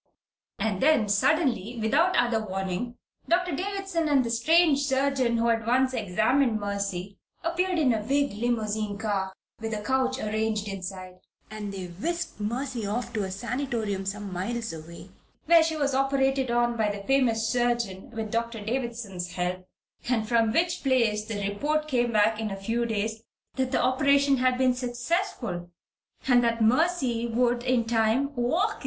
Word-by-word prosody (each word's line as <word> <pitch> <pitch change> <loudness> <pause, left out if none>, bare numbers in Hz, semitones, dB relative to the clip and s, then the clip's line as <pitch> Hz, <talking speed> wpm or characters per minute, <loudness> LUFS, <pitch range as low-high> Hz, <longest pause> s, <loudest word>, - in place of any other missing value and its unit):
And 205 -4 -1
then, 275 -7 +4
suddenly, 235 - +1
without 300 +12 +2
other 240 -2 +2
warning, 195 +4 -3 0.3
Doctor 355 +1 +2
Davison 390 -2 -2
and 275 -3 +4
the 230 - -2
strange 305 +5 +4
surgeon 270 -3 +1
who 230 +1 +2
had 225 -1 0
once 260 +2 +3
examined 220 +3 +1
Mercy, 200 -2 -4 0.2
appeared 355 +2 0
in 275 -7 +3
a 220 - -1
big 280 +4 0
limousine 215 -2 -1
car, 200 -3 -1 0.3
with 225 -1 -3
a 210 - -5
couch 260 +2 +1
arranged 215 -2 -1
inside, 185 -1 -7 0.3
and 210 -2 -5
they 190 -2 -5
whisked 320 - -4
Mercy 240 +3 -3
off 240 +3 -3
to 215 -2 -1
a - - -5
sanitarium 225 -1 -3
some 200 -1 -4
miles 225 +5 -3
away, 165 +1 -10 0.3
where 335 +1 +7
she 320 0 0
was 285 -2 0
operated 270 -1 +1
on 240 0 +2
by 220 -2 +1
the 205 -1 -5
famous 230 -3 +2
surgeon, 235 -5 -1
with 225 -2 -5
Doctor 230 0 -2
Davison's 220 -6 -4
help, 180 +1 -3 0.4
and 225 -3 +1
from 230 -1 +3
which 340 +6 +1
place 230 -6 +2
the 205 -3 -3
report 300 +9 -1
came 245 -4 +1
back 215 0 +3
in 220 -1 -2
a 195 - -4
few 230 +4 -1
days 220 0 -2 0.3
that 260 -1 -1
the - - +2
operation 280 +1 +3
had 255 0 +2
been 255 -1 +3
successful 240 - -2 0.6
and 245 -2 +5
that 230 0 +1
Mercy 250 0 +2
Curtis 230 -1 -3
would 245 -1 +2
in 250 -2 +2
time 230 +5 +1
walk 290 - +1
again! - - -9
235 Hz, 165 wpm, -27 LUFS, 210-265 Hz, 0.6 s, where